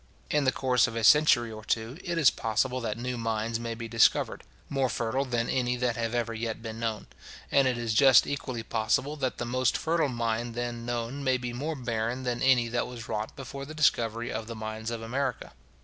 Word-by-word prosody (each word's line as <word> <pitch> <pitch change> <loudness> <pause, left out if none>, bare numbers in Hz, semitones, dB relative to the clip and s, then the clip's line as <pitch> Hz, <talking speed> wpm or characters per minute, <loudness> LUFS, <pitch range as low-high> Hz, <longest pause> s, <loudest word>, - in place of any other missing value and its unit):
In 150 -2 +2
the 130 - +4
course 130 -1 +2
of 115 - -6
a 115 - -2
century 120 -4 +5
or 110 0 -9
two, 115 +6 -2
it 175 -2 -2
is 155 -5 +6
possible 125 +4 -1
that 110 -2 -3
new 125 0 -3
mines 115 0 -1
may 115 -1 -4
be 115 0 -6
discovered, 115 0 +2 0.2
more 135 -2 0
fertile 120 +4 -1
than 120 -2 -1
any 125 -1 0
that 120 -1 0
have 115 0 -2
ever 115 -1 -1
yet 115 0 -3
been 115 0 -7
known; 115 -2 -2 0.5
and 135 -1 +4
it 125 -2 0
is 115 -2 -1
just 130 0 +7
equally 130 -5 -4
possible, 115 +7 0
that 130 -3 -2
the 120 - -3
most 130 +1 +1
fertile 160 -2 +1
mine 115 -1 -2
then 120 0 -4
known 120 +3 -3
may 130 -1 +2
be 125 -1 -5
more 150 +6 -3
barren 120 0 -2
than 120 -1 -2
any 130 -3 +4
that 120 +1 -1
was 120 -2 -8
wrought 105 +1 -3
before 135 0 -7
the 155 +3 -8
discovery 120 -6 +1
of 110 - -4
the 115 - -6
mines 110 +1 -5
of 115 -1 -4
America. 130 +2 -3
120 Hz, 215 wpm, -28 LUFS, 115-130 Hz, 0.5 s, just